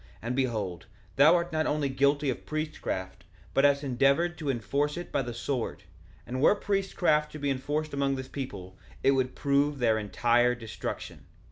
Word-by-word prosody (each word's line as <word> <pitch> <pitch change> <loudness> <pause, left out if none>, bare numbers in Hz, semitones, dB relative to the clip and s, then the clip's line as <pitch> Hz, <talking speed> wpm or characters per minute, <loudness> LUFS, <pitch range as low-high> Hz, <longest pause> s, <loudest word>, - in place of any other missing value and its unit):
And 120 +2 -3
behold, 105 -10 -2 0.3
thou 150 +5 +7
art 170 -1 -1
not 155 0 +1
only 145 -1 0
guilty 140 +1 +2
of - - -8
priestcraft, 95 - -4 0.3
but 135 - +4
hast 140 0 +3
endeavored 140 +6 +2
to 150 -3 -3
enforce 140 +5 -1
it 175 - -6
by 140 - +1
the 120 -2 -4
sword; 120 +1 -3 0.4
and 130 +2 -4
were 200 - +6
priestcraft 190 -7 +1
to - - -6
be 145 -1 -1
enforced 145 +4 -2
among 140 -1 +1
this 130 -1 -6
people 95 -10 -7 0.2
it 135 - +5
would 130 -1 0
prove 140 +1 +1
their 115 -4 +2
entire 120 +3 +2
destruction. 115 -2 -7
140 Hz, 170 wpm, -28 LUFS, 120-150 Hz, 0.4 s, thou